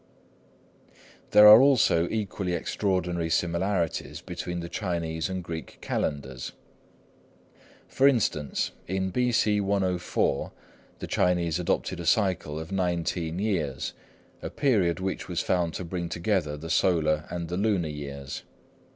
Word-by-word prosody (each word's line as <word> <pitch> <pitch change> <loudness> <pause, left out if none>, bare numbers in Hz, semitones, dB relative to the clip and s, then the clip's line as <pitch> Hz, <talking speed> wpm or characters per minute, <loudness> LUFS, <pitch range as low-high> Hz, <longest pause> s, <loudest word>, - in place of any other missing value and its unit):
There 105 0 +8
are 105 +3 +11
also 110 -11 +4
equally 100 -4 -2
extraordinary 90 -2 -1
similarities 85 +1 -1
between 90 0 -5
the 85 - -5
Chinese 85 -4 -3
and 95 -1 -4
Greek 80 -1 -7
calendars. 65 -3 -3 1.3
For 135 - +3
instance, 100 - +1 0.2
in 95 0 -1
B.C. 110 -3 +2
104 95 -7 0 0.5
the - - -6
Chinese 90 -2 +1
adopted 90 +1 -1
a 85 - -5
cycle 95 -7 +1
of 80 +2 -8
nineteen 85 -2 -1
years, 85 -10 -2 0.5
a - - -4
period 100 - +1
which 95 0 -3
was 90 -1 -1
found 85 -3 0
to 90 - -4
bring 85 0 -4
together 85 -4 -1
the 80 +3 -6
solar 75 -4 +2
and 85 -1 -4
the 90 +2 -3
lunar 100 -5 +1
years. 70 -2 -6
90 Hz, 125 wpm, -27 LUFS, 80-95 Hz, 1.3 s, are